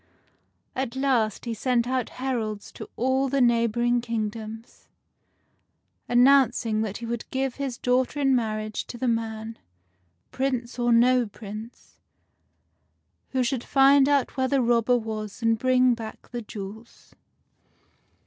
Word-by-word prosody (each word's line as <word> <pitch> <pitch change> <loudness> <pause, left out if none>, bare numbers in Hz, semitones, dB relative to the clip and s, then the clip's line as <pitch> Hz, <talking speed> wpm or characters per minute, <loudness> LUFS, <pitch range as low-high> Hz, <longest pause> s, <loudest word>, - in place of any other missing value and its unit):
At 260 -2 -3
last 250 -6 0
he 235 - -2
sent 240 +1 0
out 255 -2 -1
heralds 230 -5 -3
to - - -10
all 260 +2 +1
the 275 +1 +1
neighboring 240 0 +2
kingdoms, 225 0 -5 1.2
announcing 245 -3 +4
that 210 -2 -3
he 235 - -7
would 235 0 -5
give 265 -1 -2
his 260 -3 -3
daughter 255 +3 0
in 270 -2 +3
marriage 215 -2 -2
to 240 - -8
the 255 - -2
man 225 -1 -3 0.3
— 90 -1 -45
Prince 255 -2 -2
or 240 0 +2
no 245 +1 +4
Prince 215 +3 -10 0.6
— - - -47
who 260 -1 +1
should 245 0 -1
find 275 0 +5
out 280 -3 +1
where 260 -1 +1
the 270 -1 +2
robber 240 +1 +3
was 220 0 -6
and 225 -1 +2
bring 255 0 +4
back 225 -2 -8
the 240 -1 -4
jewels. 215 +1 -10
240 Hz, 140 wpm, -25 LUFS, 220-255 Hz, 1.2 s, find